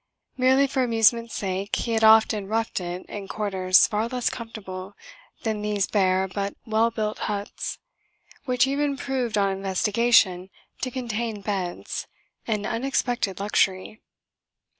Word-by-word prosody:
Merely 260 +2 +4
for 270 -1 -1
amusement's 230 -1 +2
sake 195 +1 -2
he 235 - -2
had 225 -1 +1
often 220 -2 +5
"roughed 225 +1 -1
it" 180 0 -5
in 200 -2 -7
quarters 190 -3 +3
far 215 +2 -1
less 250 0 -1
comfortable 205 -5 -8 0.5
than 220 -2 -1
these 210 -1 0
bare 190 -2 +2
but 200 +1 -4
well 225 0 +2
built 215 -2 -3
huts 205 0 -4 0.7
which 250 -1 +3
even 280 +1 0
proved, 255 -5 -2
on 200 -1 +2
investigation, 195 0 +2 0.3
to 255 - -1
contain 235 -4 -3
beds: 190 -4 -4 0.4
an 210 -3 -1
unexpected 240 -5 -1
luxury. 195 0 0
215 Hz, 130 wpm, -25 LUFS, 195-235 Hz, 0.7 s, often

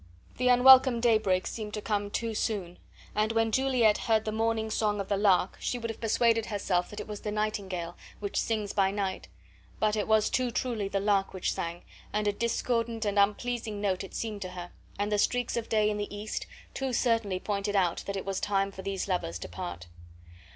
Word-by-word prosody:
The 250 - +1
unwelcome 255 0 +7
daybreak 215 -6 +2
seemed 215 -2 -5
to - - -3
come 205 -2 -1
too 225 +2 -2
soon, 195 -5 -2 0.3
and 215 +1 +1
when 225 0 +2
Juliet 250 -4 +3
heard 220 -1 +1
the 215 - -1
morning 220 0 0
song 210 -1 0
of 195 - -4
the 200 - +2
lark 195 -2 +3
she 245 - -2
would 230 -1 -3
have 225 - -12
persuaded 225 0 +2
herself 185 -4 0
that 210 - -8
it - - -6
was 210 -1 -6
the 210 - -3
nightingale, 195 -5 -2 0.2
which 200 -1 -4
sings 215 -3 -2
by 195 -1 +3
night; 195 -1 -3 0.5
but 215 0 +2
it 210 - -1
was 220 -1 +3
too 255 -1 +1
truly 235 -4 -2
the 195 0 -1
lark 195 -1 +1
which 185 - -1
sang, 170 +1 -4 0.3
and 210 0 0
a - - +4
discordant 230 0 -1
and 205 0 +1
unpleasing 215 +1 0
note 195 -2 0
it 195 - -10
seemed 215 -3 -4
to 185 - -4
her; 175 -1 -7 0.3
and 205 +1 -1
the 210 - +2
streaks 245 +3 +1
of 235 -1 -3
day 215 -1 +3
in 210 0 0
the 205 0 -4
east 215 +1 -4 0.3
too 265 -1 -2
certainly 225 -6 +1
pointed 205 +1 -2
out 180 -3 +2
that 200 0 -2
it 195 - -5
was 195 -1 -2
time 195 -1 0
for 190 - -9
these 195 0 -3
lovers 175 - -1
to - - -7
part. 85 -1 -6
210 Hz, 210 wpm, -29 LUFS, 195-225 Hz, 0.5 s, unwelcome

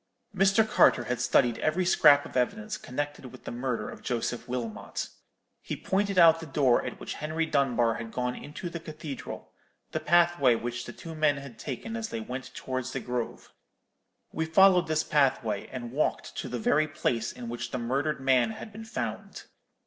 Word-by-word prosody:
"Mr. 195 +3 +4
Carter 125 - +5
had 125 +1 -2
studied 125 -1 +3
every 165 +4 +1
scrap 145 -5 +6
of - - -11
evidence 210 - 0
connected 145 -3 -5
with - - -13
the - - -6
murder 120 -3 -2
of - - -9
Joseph 120 0 -2
Wilmot. 120 -4 -4 0.5
He - - -4
pointed 200 0 0
out 165 -2 +7
the 165 - -8
door 135 -3 +3
at - - -6
which - - -5
Henry 160 +2 -1
Dunbar 125 -6 +2
had 115 -1 -7
gone 125 0 -1
into 150 +7 -7
the 170 0 -5
cathedral, 155 -3 -7 0.4
the - - -1
pathway 170 -7 +4
which 120 +1 -4
the - - -7
two 165 - -9
men 155 -2 +2
had 140 -4 -10
taken 155 - -5
as 225 -1 -3
they 115 - -4
went 125 +4 -6
towards 130 -1 -4
the 135 - -2
grove. 125 -2 -4 0.8
We 160 - -1
followed 180 +1 +6
this 155 0 +1
pathway, 130 -8 +1
and 120 -2 -6
walked 145 +4 -1
to - - -4
the 125 - -3
very 150 +7 +2
place 120 -6 -1
in 120 -1 -8
which 120 +1 -4
the - - -3
murdered 135 +6 -1
man 130 -3 +3
had 215 - -9
been 220 +2 -9
found. 225 - -5
140 Hz, 185 wpm, -28 LUFS, 125-165 Hz, 0.8 s, out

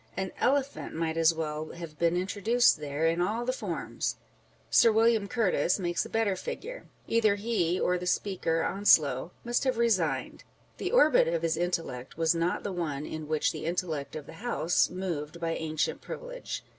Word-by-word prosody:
An 190 -1 -2
elephant 280 - 0
might 160 0 -1
as 165 0 +5
well 155 -1 -4
have 170 -3 -9
been 170 +1 +2
introduced 205 +3 +2
there, 145 +1 -2
in 165 +1 +2
all 220 +6 -1
the 255 - 0
forms: - - -3 0.6
Sir 230 - +6
William 225 -1 +3
Curtis 200 -5 +1
makes 175 -3 -1
a - - -17
better 225 -3 +1
figure. - - -7 0.2
Either 220 -3 +3
he 200 -5 0
or 180 0 +1
the 180 - -5
Speaker 175 -4 0
(Onslow) 155 -8 +3
must 240 0 0
have 260 -3 0
resigned. 180 - 0 0.3
The - - -3
orbit 395 -11 +5
of 165 0 -1
his 165 -1 +1
intellect 165 -8 -3
was 165 0 +3
not 170 +1 -1
the 200 - -3
one 155 -5 -3
in 155 -1 -6
which 155 0 +1
the - - -6
intellect 165 -4 -3
of 155 -2 -6
the 160 - -12
House 180 -8 +2
moved 170 -4 -4
by 165 -1 -1
ancient 155 -2 -2
privilege. - - -7
175 Hz, 175 wpm, -29 LUFS, 160-220 Hz, 0.6 s, Sir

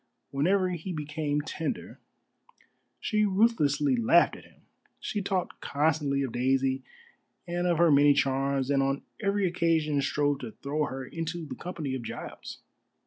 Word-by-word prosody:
Whenever 185 +7 +2
he 180 +1 -4
became 150 -2 -2
tender, 160 +1 -4 1.0
she 215 -1 +1
ruthlessly 155 - +3
laughed 120 +9 +4
at - - -13
him: - - -22 0.4
she 205 - -3
talked 185 -2 -2
constantly 145 -2 +1
of 130 - -3
Daisy 130 +2 +1 0.7
and 175 +1 -1
of 170 -2 +2
her 170 -1 +5
many 145 0 +6
charms, 135 0 +1
and 140 -1 +3
on 135 +1 0 0.2
every 200 -1 +1
occasion 165 -4 +1
strove 145 0 +1
to 120 -5 -7
throw 150 +2 0
her 135 -1 -5
into 165 +3 -4
the - - -6
company 160 -6 -5
of 130 - -3
Giles. 115 - -8
150 Hz, 145 wpm, -28 LUFS, 140-175 Hz, 1.0 s, many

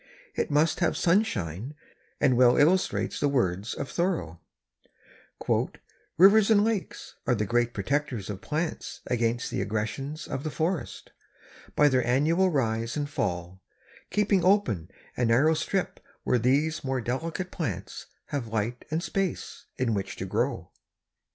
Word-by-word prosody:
It - - -1
must 150 +2 +2
have 175 - +1
sunshine 130 - 0 0.4
and 130 -3 +3
well 125 0 +5
illustrates 175 +6 +2
the 145 - +2
words 100 -6 0
of - - -4
Thoreau: 170 - -2 1.8
"Rivers 200 +4 +7
and 205 -2 +5
lakes 220 -3 -3
are 125 - +3
the 105 -1 -1
great 120 +3 +1
protectors 125 0 -2
of 100 -2 -6
plants 155 +2 -3
against 120 0 -1
the - - -1
aggressions 125 +8 -3
of 135 - -4
the 155 - -2
forest, 160 +2 -3 0.6
by 150 - +5
their 130 -3 +3
annual 155 +10 +3
rise 115 -5 -1
and 145 -1 -1
fall, 90 - -3 0.5
keeping 205 -3 +2
open 180 - +2 0.3
a 125 - -1
narrow 130 +8 +4
strip 185 +4 -2 0.2
where 125 - +2
these 140 +7 +1
more 135 -1 -1
delicate 165 - -3
plants 100 - -5 0.2
have 135 -5 -3
light 110 +2 -3
and 160 +2 -1
space 195 +1 -3
in 125 -3 0
which 100 -2 -3
to - - -5
grow." - - -2
135 Hz, 140 wpm, -27 LUFS, 115-165 Hz, 1.8 s, Rivers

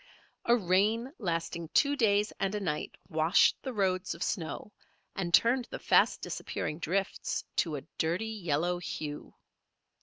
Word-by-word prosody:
A 235 - +5
rain 215 - +1
lasting 170 -3 -2
two 285 -1 +4
days 210 -4 +2
and 195 +1 0
a - - -1
night 150 -6 -3
washed 160 +1 +4
the 265 - -4
roads 190 -5 0
of - - -4
snow 165 +4 -3 0.4
and 180 -3 -2
turned 240 +8 +4
the - - -7
fast - - +3
disappearing 155 - -4
drifts 190 +4 -2
to 160 -4 +1
a 140 - -4 0.2
dirty 170 +7 0
yellow 175 -5 -1
hue. 150 -3 -6
185 Hz, 145 wpm, -30 LUFS, 165-210 Hz, 0.4 s, A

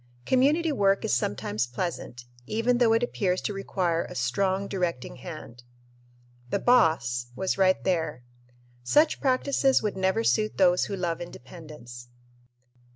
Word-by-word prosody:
Community 295 +6 +2
work 195 -7 +2
is - - 0
sometimes 110 0 -1
pleasant, 120 -3 -5 0.2
even 235 - +1
though 235 -2 +4
it 225 +1 +2
appears 185 -6 -1
to 210 - -3
require 180 -4 -1
a - - -10
strong 190 +11 0
directing 175 -11 -3
hand. 130 -4 -10 0.9
The - - 0
"boss" 160 - +2
was 190 +6 -2
right 185 -1 +3
there. 160 -8 -1 0.6
Such 300 - +3
practices 270 0 +2
would 210 -2 -2
never 190 +4 0
suit 215 -1 +1
those 180 -2 +4
who 200 - -4
love 175 -3 -3
independence. 130 -6 -11
185 Hz, 135 wpm, -26 LUFS, 140-220 Hz, 0.9 s, though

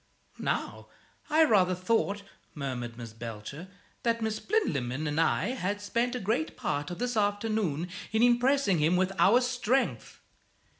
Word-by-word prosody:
"Now, - - -2 0.4
I 315 +1 +5
rather 185 - +4
thought," 200 +1 0 0.3
murmured 125 -5 -4
Miss 115 -2 -8
Belcher, 115 - -7 0.3
"that 230 -1 +1
Miss 220 -1 -2
Plinlimmon 145 - -1
and 150 +1 -1
I 165 +5 +1
had 205 -5 -2
spent 235 +5 -1
a - - -2
great 235 - -1
part 145 +1 -2
of 175 - -5
this 245 +1 -2
afternoon 205 -6 0 0.2
in 220 +2 +2
impressing 245 - +3
him 160 +4 +3
with 185 +1 +2
our 230 +6 +6
strength." 250 +1 -1
205 Hz, 145 wpm, -29 LUFS, 155-240 Hz, 0.4 s, our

